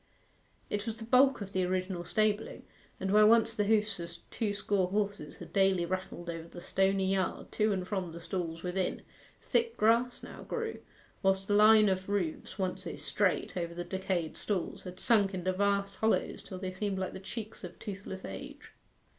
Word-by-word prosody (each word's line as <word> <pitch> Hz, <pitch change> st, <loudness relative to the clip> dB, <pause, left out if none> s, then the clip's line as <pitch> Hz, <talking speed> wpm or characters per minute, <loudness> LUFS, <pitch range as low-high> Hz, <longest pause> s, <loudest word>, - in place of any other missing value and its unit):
It 205 Hz, +2 st, -3 dB
was 225 Hz, 0 st, -3 dB
the 225 Hz, -, -7 dB
bulk 255 Hz, +1 st, +5 dB
of 195 Hz, -1 st, -5 dB
the 185 Hz, -1 st, +1 dB
original 185 Hz, -1 st, -1 dB
stabling, 215 Hz, +2 st, 0 dB, 0.4 s
and 190 Hz, 0 st, -1 dB
where 210 Hz, 0 st, +7 dB
once 225 Hz, 0 st, +5 dB
the 210 Hz, -2 st, 0 dB
hoofs 215 Hz, -2 st, +2 dB
of 170 Hz, 0 st, -6 dB, 0.2 s
two 220 Hz, -4 st, -1 dB
score 200 Hz, -2 st, +1 dB
horses 200 Hz, -5 st, -2 dB
had 170 Hz, -1 st, -11 dB
daily 190 Hz, -3 st, +3 dB
rattled 185 Hz, -1 st, -4 dB
over 165 Hz, -1 st, -5 dB
the 175 Hz, -, -10 dB
stony 190 Hz, +1 st, +1 dB
yard, 190 Hz, -1 st, -1 dB
to 215 Hz, 0 st, +2 dB
and 185 Hz, -2 st, -1 dB
from 190 Hz, -4 st, -2 dB
the 170 Hz, -, -8 dB
stalls 165 Hz, -2 st, -4 dB
within, 180 Hz, 0 st, -1 dB, 0.4 s
thick 460 Hz, -1 st, +1 dB
grass 230 Hz, +3 st, +3 dB
now -, -, -9 dB
grew, 455 Hz, -1 st, -3 dB, 0.4 s
whilst 195 Hz, 0 st, +2 dB
the 205 Hz, -, +1 dB
line 215 Hz, +1 st, +7 dB
of 190 Hz, 0 st, 0 dB
roofs 195 Hz, -3 st, -2 dB
once 185 Hz, -2 st, -2 dB
so -, -, -4 dB
straight -, -, 0 dB
over 170 Hz, -2 st, -3 dB
the 175 Hz, -, -3 dB
decayed 190 Hz, -3 st, -2 dB
stalls, 195 Hz, -3 st, -2 dB
had 180 Hz, 0 st, -8 dB
sunk 205 Hz, -4 st, +3 dB
into 185 Hz, 0 st, -1 dB
vast 200 Hz, 0 st, +1 dB
hollows 220 Hz, 0 st, +1 dB
till 185 Hz, -, -8 dB
they 185 Hz, 0 st, -4 dB
seemed 200 Hz, 0 st, -2 dB
like 190 Hz, 0 st, -2 dB
the -, -, -6 dB
cheeks 215 Hz, +3 st, -7 dB
of -, -, -8 dB
toothless 195 Hz, -2 st, -7 dB
age. 95 Hz, -1 st, -8 dB
195 Hz, 190 wpm, -31 LUFS, 185-210 Hz, 0.4 s, where